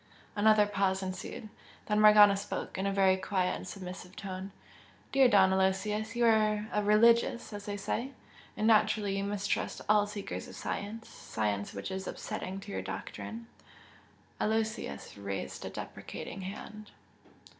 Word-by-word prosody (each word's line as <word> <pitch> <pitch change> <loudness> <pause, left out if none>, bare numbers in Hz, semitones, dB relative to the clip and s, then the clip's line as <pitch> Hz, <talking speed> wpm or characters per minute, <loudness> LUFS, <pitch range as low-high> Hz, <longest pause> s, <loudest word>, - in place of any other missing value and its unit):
Another 215 0 +5
pause 195 -2 0
ensued. 190 +3 -6 0.4
Then 210 0 +2
Morgana 210 -1 +8
spoke, 200 +1 -5
in 190 +1 -1
a - - +1
very 190 -1 +4
quiet 185 -1 0
and - - -8
submissive 185 -1 -8
tone. 190 0 -6 0.6
"Dear 270 -1 +6
Don 190 -4 +5
Aloysius, 210 +4 0
you 240 0 +3
are 215 -2 +3
a 210 - +2
'religious' 230 +2 +4
as 205 +1 -7
they 205 0 -3
say 240 +6 -3 0.4
and 215 - 0
naturally 215 -2 +3
you 195 - -1
mistrust 200 0 -2
all 210 0 +4
seekers 205 -1 -6
of - - -11
science 220 +3 -5
science 105 -2 -3
which 100 - -5
is 190 0 -4
upsetting 190 +1 -5
to 200 - -9
your - - -3
doctrine." 230 +1 -6 0.9
Aloysius 220 - -2
raised 100 -8 -5
a - - -4
deprecating 195 - -7
hand. 210 +2 -8
205 Hz, 145 wpm, -31 LUFS, 190-215 Hz, 0.9 s, Morgana